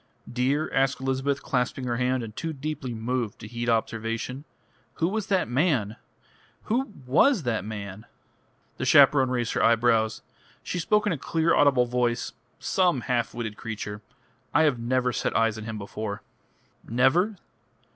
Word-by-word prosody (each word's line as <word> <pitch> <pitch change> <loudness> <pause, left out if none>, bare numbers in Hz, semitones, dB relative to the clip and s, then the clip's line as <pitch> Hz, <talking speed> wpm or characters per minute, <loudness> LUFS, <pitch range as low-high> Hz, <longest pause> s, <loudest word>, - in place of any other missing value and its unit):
"Dear," 135 +5 0
asked 135 0 +2
Elizabeth, 135 +1 -1
clasping 125 0 -1
her 120 -1 -1
hand, 125 0 0
and 110 -1 -8
too 165 -1 -3
deeply 145 -2 -4
moved 115 -1 -2
to 110 - -9
heed 120 +1 -3
observation, 115 +4 -2 0.5
"who 165 - +1
was 210 +2 -2
that 190 -2 +1
man? 125 - +1 0.7
Who 245 +2 -1
was 180 - +4
that 115 -6 -1
man?" 105 0 -7 0.7
The - - -2
chaperone 135 -3 +6
raised 120 -2 -1
her - - 0
eyebrows. 115 -1 +3 0.4
She 180 - -3
spoke 210 +5 +2
in 205 - +2
a 150 - -5
clear, 165 +5 +1
audible 135 -4 +4
voice. 120 -1 -1 0.2
"Some 155 +1 +1
half 120 -3 -1
witted 110 -3 -4
creature. 105 -2 -6 0.5
I 160 - +6
have 145 -6 +2
never 125 +1 0
set - - -1
eyes 115 -1 +2
on 110 - -7
him 110 -1 -5
before." 100 0 -5 0.6
"Never?" 140 - +2
125 Hz, 155 wpm, -26 LUFS, 115-145 Hz, 0.7 s, chaperone